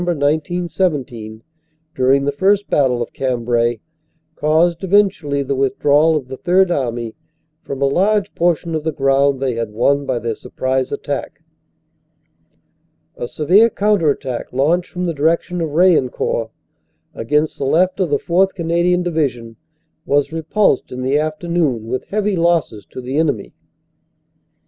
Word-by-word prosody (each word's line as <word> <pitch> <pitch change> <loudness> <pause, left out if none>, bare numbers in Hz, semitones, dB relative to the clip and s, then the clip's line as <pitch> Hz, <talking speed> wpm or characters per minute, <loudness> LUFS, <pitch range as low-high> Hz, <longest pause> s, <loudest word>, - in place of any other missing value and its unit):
1917, 150 - -2 0.5
during 135 +2 +2
the 145 - +1
first 195 +7 +1
battle 125 -4 +2
of - - -11
Cambrai, 120 -2 0 0.5
caused 160 +3 +1
eventu 195 -3 +2
ally 140 -1 -1
the 140 +1 -2
withdrawal 145 +4 +2
of 140 -5 -3
the 130 0 -7
Third 180 +3 +2
Army 120 -6 -2 0.5
from 140 0 -4
a - - +4
large 200 +9 +1
portion 170 -1 0
of 155 -1 -2
the 160 - -1
ground 135 -1 +2
they 130 -2 -1
had 115 -1 -3
won 140 +6 +1
by 130 -2 0
their 115 -1 -2
surprise 130 +3 -3
attack. - - -5 1.7
"A 120 - -5
severe 185 - +4
counter 205 -7 +1
attack 130 -3 -3
launched 160 +8 +1
from 180 0 -4
the 170 - -1
direction 165 +4 0
of 155 -3 -3
Raillencourt, 150 -9 +2 0.6
against 150 +7 -1
the - - -2
left 180 +6 +2
of 185 -4 +1
the 145 - +2
4th. 190 +6 +1
Canadian 175 +1 +1
Division, 135 -9 -2 0.5
was 145 +2 +1
repulsed 165 0 0
in 125 0 -5
the 135 +3 +1
afternoon 155 -6 -1
with 125 +3 -4
heavy 210 -1 -1
losses 165 - 0
to 130 - -8
the 130 +3 -4
enemy. 160 -2 -1
150 Hz, 145 wpm, -18 LUFS, 130-175 Hz, 1.7 s, a